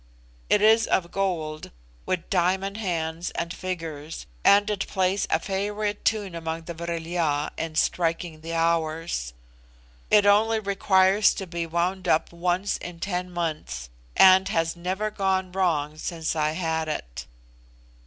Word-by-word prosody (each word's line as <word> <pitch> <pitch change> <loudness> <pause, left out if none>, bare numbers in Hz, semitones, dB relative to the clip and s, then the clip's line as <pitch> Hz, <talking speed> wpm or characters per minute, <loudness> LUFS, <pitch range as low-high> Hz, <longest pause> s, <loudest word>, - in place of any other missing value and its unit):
It 210 0 +4
is 220 +1 +5
of 170 -2 +1
gold, 160 -6 -2 0.4
with 180 -2 -2
diamond 190 +2 +1
hands 170 -4 -2
and 170 +1 -3
figures, 165 -4 -6 0.2
and 200 +1 +6
it 210 -2 -2
plays 190 +1 0
a 160 - +2
favorite 205 +3 -2
tune 205 -4 0
among 165 0 -4
the 170 - -6
Vril 170 0 -4
ya 160 -4 0
in 165 -1 -4
striking 165 -1 0
the 165 +1 -5
hours: 165 - -1 0.7
it 210 -1 +5
only 220 +2 +4
requires 195 0 +3
to 195 - -4
be 170 -1 -4
wound 180 +3 -1
up 160 0 +2
once 180 +3 0
in 175 -1 -8
ten 180 0 -2
months, 155 - -4 0.3
and 190 0 +7
has 165 0 0
never 190 +5 -2
gone 190 -2 0
wrong 155 -5 0
since 165 -2 -3
I 155 -1 +1
had 160 -2 -1
it. 60 - -5
175 Hz, 145 wpm, -25 LUFS, 160-190 Hz, 0.7 s, and